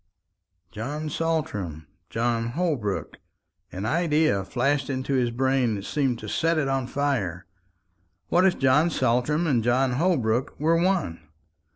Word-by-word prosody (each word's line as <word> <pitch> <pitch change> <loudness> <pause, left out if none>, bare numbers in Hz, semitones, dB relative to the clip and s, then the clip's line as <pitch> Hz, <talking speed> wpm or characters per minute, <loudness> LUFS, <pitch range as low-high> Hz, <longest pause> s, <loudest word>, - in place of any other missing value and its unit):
John 145 +10 -4
Saltram 105 - -2 0.2
John 115 0 -1
Holbrook. 145 - -2 0.5
An 95 +3 -5
idea 155 - +2
flashed 135 +6 0
into 130 0 -2
his 125 -2 +2
brain 130 -1 +1
that 100 0 -6
seemed 135 -5 0
to - - -7
set 165 0 +1
it 150 -3 +1
on 135 -2 -1
fire. 115 -12 -1 0.8
What 180 - +4
if 190 -1 +3
John 140 +5 +4
Saltram 130 +4 +1
and 125 -8 +2
John 125 +2 +2
Holbrook 125 -5 0
were 160 +3 +3
one! 175 - 0
130 Hz, 135 wpm, -25 LUFS, 115-155 Hz, 0.8 s, What